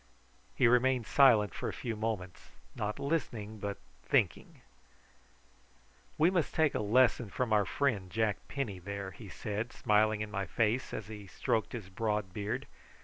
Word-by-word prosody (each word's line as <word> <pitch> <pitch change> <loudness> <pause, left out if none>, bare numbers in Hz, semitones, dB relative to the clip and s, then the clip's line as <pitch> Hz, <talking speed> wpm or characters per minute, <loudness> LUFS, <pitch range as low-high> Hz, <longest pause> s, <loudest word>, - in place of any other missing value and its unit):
He 125 - +4
remained 125 0 +3
silent 110 - +5
for - - -3
a - - -5
few 115 -2 -4
moments, 105 -5 -4 0.3
not 105 0 -2
listening 120 -8 -2
but 100 0 -3 0.2
thinking. - - 0 1.6
"We 160 +4 +4
must 175 -5 0
take 155 -2 +3
a - - -1
lesson 115 +1 +3
from 120 +1 -1
our 105 -1 +4
friend 105 -5 0
Jack 110 0 +1
Penny, 115 -10 -3
there," 100 +1 -5
he 85 - -11
said, 105 +3 -4
smiling 105 0 +2
in 105 0 -4
my 100 -1 -2
face 115 +3 0
as 105 - -5
he 105 -2 -9
stroked 110 +4 -1
his 105 -6 -6
broad 105 -1 -2
beard. 110 +7 -3
110 Hz, 155 wpm, -32 LUFS, 100-125 Hz, 1.6 s, silent